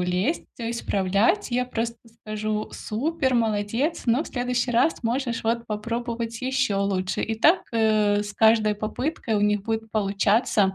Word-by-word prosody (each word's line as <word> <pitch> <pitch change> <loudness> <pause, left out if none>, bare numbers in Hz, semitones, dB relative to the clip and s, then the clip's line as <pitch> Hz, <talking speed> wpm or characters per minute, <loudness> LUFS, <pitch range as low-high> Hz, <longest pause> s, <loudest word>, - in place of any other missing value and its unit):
лезть, 180 - 0
всё 230 -1 -4
исправлять, 215 - +1
я 250 +1 0
просто 235 -1 -3 0.2
скажу: 215 0 -3
"Супер, 265 +3 -1
молодец, 225 +7 0
но 245 +7 +2
в - - -10
следующий 245 0 -1
раз 245 +7 +2
можешь 240 0 -1
вот 235 +1 0
попробовать 230 +1 -3
ещё 260 -6 0
лучше". 190 -2 -1
И 225 - -1
так, 325 +10 +5
э, 215 -2 +3
с 205 0 -7
каждой 220 -1 +4
попыткой 220 +3 -3
у 205 - +2
них 210 -1 +2
будет 225 0 -3
получаться. 200 -1 +2
225 Hz, 150 wpm, -24 LUFS, 210-245 Hz, 0.2 s, так